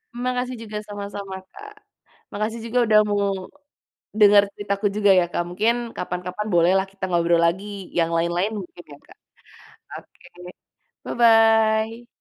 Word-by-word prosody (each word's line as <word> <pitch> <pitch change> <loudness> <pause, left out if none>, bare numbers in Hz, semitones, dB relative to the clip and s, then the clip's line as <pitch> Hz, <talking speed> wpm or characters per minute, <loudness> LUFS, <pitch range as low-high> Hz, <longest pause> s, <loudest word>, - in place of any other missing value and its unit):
Makasih 250 +1 -2
juga, 215 -1 -7
sama-sama, 200 -1 -7 0.2
Kak. 420 +1 -12 0.6
Makasih 220 +3 -3
juga 245 +2 0
udah 215 -1 +5
mau 205 0 0 1.0
denger 205 -1 +7
ceritaku 200 0 -4
juga 205 -2 +4
ya, 175 - +1
Kak. 175 - -1
Mungkin 215 +6 +1 0.2
kapan-kapan 180 +3 -5
boleh 170 +1 +4
lah 190 - 0
kita 195 -1 -5
ngobrol 170 -1 +2
lagi 195 +2 -3
yang 165 -1 +2
lain-lain 175 +5 0
mungkin 175 -2 -10
ya, - - -13
Kak. - - -18 0.8
Oke, - - -21 0.8
bye-bye. 225 0 +3
205 Hz, 135 wpm, -22 LUFS, 180-225 Hz, 1.0 s, denger